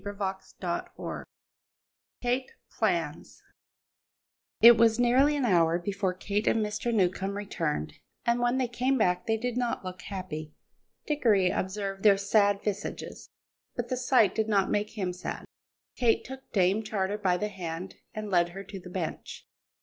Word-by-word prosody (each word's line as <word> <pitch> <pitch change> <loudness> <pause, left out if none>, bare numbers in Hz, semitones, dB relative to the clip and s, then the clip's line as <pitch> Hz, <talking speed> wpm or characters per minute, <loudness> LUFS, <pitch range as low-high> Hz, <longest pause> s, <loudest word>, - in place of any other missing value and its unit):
CHAPTER 200 -2 -4
VII - - -5 1.0
KATE 250 +2 0 0.2
PLANS 170 -9 -2 1.2
It 235 +1 +10
was 225 -1 +4
nearly 260 +5 +4
an 275 - +1
hour 170 -5 +4
before 190 +1 -2
Kate 205 +3 -2
and 220 -2 +3
Mr. 210 +3 -2
Newcombe 195 -1 +1
returned, 150 - -2 0.3
and 235 0 +2
when 240 +1 +2
they 255 -1 +1
came 255 +3 0
back 180 -5 +1
they 225 0 +2
did 245 +1 -3
not 240 -5 -1
look 185 0 -6
happy. 155 -6 -6 0.5
Dickory 220 -11 +3
observed 195 0 -3
their 200 -2 +6
sad 200 0 +2
visages, 205 0 -4 0.5
but - - -3
the 255 - 0
sight 250 -5 +3
did 220 0 -1
not 200 -3 +2
make 210 +2 -1
him 185 -3 -1
sad. 180 - -6 0.5
Kate 235 -2 +2
took 265 +1 -10
Dame 195 +1 +3
Charter 210 -2 -2
by 185 -3 +2
the 210 +3 -2
hand 180 -1 -6 0.2
and 215 -1 -6
led 175 -1 +3
her 195 +3 -8
to 195 -1 -8
the 180 - -11
bench. 180 -3 -5
205 Hz, 155 wpm, -28 LUFS, 185-230 Hz, 1.2 s, It